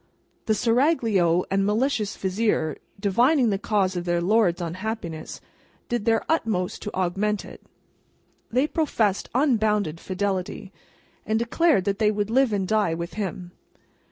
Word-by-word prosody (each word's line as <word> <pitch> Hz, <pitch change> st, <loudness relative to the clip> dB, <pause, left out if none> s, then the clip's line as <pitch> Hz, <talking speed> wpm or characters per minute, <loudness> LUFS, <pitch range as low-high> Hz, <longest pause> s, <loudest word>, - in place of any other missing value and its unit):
The 215 Hz, -, +3 dB
Seraglio 225 Hz, -, +2 dB
and 195 Hz, 0 st, +2 dB
malicious 215 Hz, +1 st, 0 dB
Vizier, 190 Hz, -5 st, 0 dB, 0.2 s
divining 240 Hz, +5 st, +3 dB
the 195 Hz, -, -1 dB
cause 195 Hz, -3 st, 0 dB
of 175 Hz, -, -2 dB
their 175 Hz, -1 st, +1 dB
Lord's 190 Hz, -1 st, +2 dB
unhappiness, 175 Hz, -2 st, -5 dB, 0.5 s
did 240 Hz, -3 st, -1 dB
their 225 Hz, -1 st, +2 dB
utmost 220 Hz, -, -1 dB
to 210 Hz, -, -6 dB
augment 195 Hz, +3 st, -1 dB
it. -, -, -12 dB, 0.9 s
They 255 Hz, +5 st, +2 dB
professed 235 Hz, -, 0 dB
unbounded 215 Hz, -, +1 dB
fidelity, 190 Hz, 0 st, -3 dB, 0.5 s
and 220 Hz, +1 st, 0 dB
declared 240 Hz, -, +2 dB
that 200 Hz, -1 st, -1 dB
they 215 Hz, -2 st, +4 dB
would 210 Hz, 0 st, -1 dB
live 260 Hz, 0 st, +3 dB
and 195 Hz, -2 st, -1 dB
die 210 Hz, -6 st, +1 dB
with 170 Hz, +1 st, -5 dB
him. 185 Hz, -3 st, -5 dB
210 Hz, 135 wpm, -24 LUFS, 185-230 Hz, 0.9 s, they